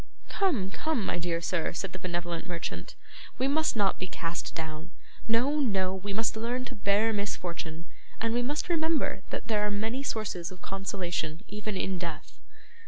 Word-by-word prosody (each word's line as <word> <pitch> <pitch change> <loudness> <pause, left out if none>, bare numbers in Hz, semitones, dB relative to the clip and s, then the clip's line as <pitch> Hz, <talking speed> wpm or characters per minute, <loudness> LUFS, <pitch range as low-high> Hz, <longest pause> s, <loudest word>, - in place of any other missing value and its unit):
'Come, 265 - +2
come, 310 -7 0
my 175 - +1
dear 170 -1 0
sir,' 170 -1 +1
said 190 +2 -2
the 185 - -5
benevolent 175 -1 -2
merchant; 165 - -3 0.4
'we 260 - +3
must 310 0 +3
not 200 -3 +3
be 185 - -2
cast 170 -1 -3
down; 160 +1 -4 0.4
no, 250 +7 +4
no. 195 -8 +3
We 190 +2 -3
must 220 +3 +1
learn 240 +3 0
to - - -5
bear 205 +2 +3
misfortune, 170 -5 -2 0.3
and 230 0 +2
we 240 - +3
must 290 +5 0
remember 325 -2 +2
that - - -3
there 215 -2 +3
are 210 - +2
many 220 +6 0
sources 215 -10 -1
of 185 - -9
consolation 180 -3 -2
even 210 -1 -2
in 185 -1 0
death. 170 -3 -5
200 Hz, 170 wpm, -30 LUFS, 175-230 Hz, 0.4 s, no